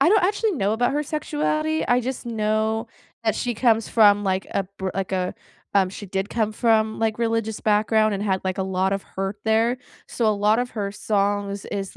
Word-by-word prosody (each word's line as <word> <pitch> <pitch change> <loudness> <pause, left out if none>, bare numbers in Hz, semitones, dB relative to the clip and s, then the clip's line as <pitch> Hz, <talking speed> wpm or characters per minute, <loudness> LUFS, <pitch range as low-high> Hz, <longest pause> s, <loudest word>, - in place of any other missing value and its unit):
I 305 +6 +5
don't 420 -3 +5
actually 410 +3 +1
know 205 - 0
about 245 +2 +1
her 295 +1 0
sexuality, 305 +1 -1
I 245 0 +4
just 255 -1 -4
know 220 0 0 0.4
that 220 - +2
she 245 -2 -2
comes 225 -2 +2
from, 205 -2 +5
like, 190 0 0
a 195 - -1
br 190 0 -2
like 195 -1 -2
a 185 -1 -1 0.4
um, 190 -2 +4
she 205 - -8
did 190 +1 -2
come 215 -2 0
from, 220 -1 +2
like, 225 0 0
religious 225 -2 -1
background 215 0 +3
and 200 - -3
had, 190 -2 0
like, 185 0 -2
a 190 - +1
lot 190 0 0
of 195 - -1
hurt 195 +1 -4
there. 225 +3 +2 0.3
So, 230 - -1
a - - +5
lot 210 +2 +2
of 245 0 -1
her 200 -2 -3
songs 200 -1 -1
is, 195 -1 -5
215 Hz, 210 wpm, -23 LUFS, 200-235 Hz, 0.4 s, I